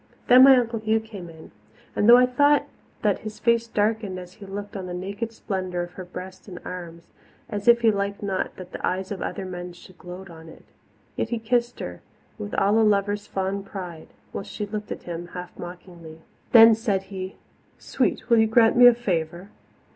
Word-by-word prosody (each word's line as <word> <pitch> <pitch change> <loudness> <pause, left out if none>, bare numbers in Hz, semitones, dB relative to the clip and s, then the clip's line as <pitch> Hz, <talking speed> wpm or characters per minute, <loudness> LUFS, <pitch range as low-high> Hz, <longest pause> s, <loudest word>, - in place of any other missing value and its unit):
Then 250 +1 +8
my 270 -1 +8
Uncle 230 -2 0
Hugh 220 +1 +1
came 205 -6 -10
in, 160 -1 -14 0.4
and 205 - +3
though 240 - +10
I 250 - +6
thought 285 +3 +3 0.4
that 205 -3 +2
his 215 -1 -8
face 235 0 +2
darkened 215 -3 -1
as 180 0 -9
he 205 -1 -12
looked 205 +2 -7
on 190 -2 -5
the 175 - -5
naked 200 +5 -4
splendour 185 -5 -3
of 175 - -8
her 185 0 -9
breast 185 +2 -9
and 180 -3 -9
arms, 170 -2 -8 0.4
as 205 -1 -5
if 235 0 +6
he 225 -2 +5
liked 200 0 -3
not 195 -2 -2
that 185 -1 -10
the - - -8
eyes 185 +1 -2
of 200 - -5
other 195 - -4
men 180 -1 -7
should 175 +1 -16
gloat 180 +1 -10
on 160 0 -12
it, - - -15 0.5
yet - - -2
he 235 - -1
kissed 240 +1 -1
her 90 0 -7 0.4
with 100 - -5
all 205 +3 +3
a - - +5
lover's 205 -1 +1
fond 195 +1 -3
pride, 180 -5 -8 0.2
while - - -5
she 210 +2 -5
looked 210 0 -6
at - - -6
him 175 0 -6
half 180 0 -7
mockingly. 175 -2 -10 0.3
Then 225 -2 +9
said 215 -4 -1
he, 185 0 -6 0.4
"Sweet, - - -1
will 235 -2 +5
you 220 - +4
grant 225 0 +4
me 245 0 +9
a 245 - +7
favour?" 175 -4 -3
200 Hz, 205 wpm, -24 LUFS, 180-225 Hz, 0.5 s, though